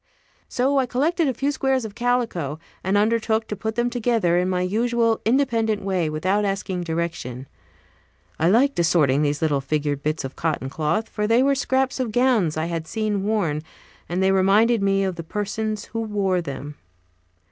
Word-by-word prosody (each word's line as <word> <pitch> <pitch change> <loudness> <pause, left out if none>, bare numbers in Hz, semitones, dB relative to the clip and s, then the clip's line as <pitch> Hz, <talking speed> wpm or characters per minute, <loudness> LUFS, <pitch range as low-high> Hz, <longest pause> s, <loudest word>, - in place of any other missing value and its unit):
So 270 +3 +1
I 260 - +1
collected 310 +7 +1
a 265 - +1
few 275 +4 0
squares 265 -3 0
of 215 - -7
calico, 230 - -1 0.3
and 190 +2 +1
undertook 220 +1 +1
to 210 - -4
put 220 +2 -4
them 240 0 +1
together 230 -7 +1
in 180 +1 0
my 180 -1 0
usual 230 +3 +1
independent 225 -4 +1
way, 185 -5 0
without 185 +7 0
asking 195 -2 -2
direction. 160 -7 -3 0.9
I 165 - +3
liked 260 +6 +3
assorting 150 -5 +3
those 145 +1 0
little 145 -3 +1
figured 145 0 -1
bits 155 +2 -2
of 135 0 -6
cotton 155 -5 -2
cloth, 160 +10 -1
for 210 -1 -2
they 230 +3 +4
were 280 +1 +3
scraps 265 -1 0
of 250 -4 -1
gowns 225 -10 +2
I 160 - 0
had 165 -2 -4
seen 215 -1 -1
worn, 185 -9 0 0.5
and 180 +2 0
they 190 - +4
reminded 200 +4 +4
me 195 0 +2
of 190 -2 -2
the 165 - -5
persons 210 +4 -3
who 225 - -5
wore 200 -4 0
them. 145 -1 -7
205 Hz, 180 wpm, -23 LUFS, 165-230 Hz, 0.9 s, they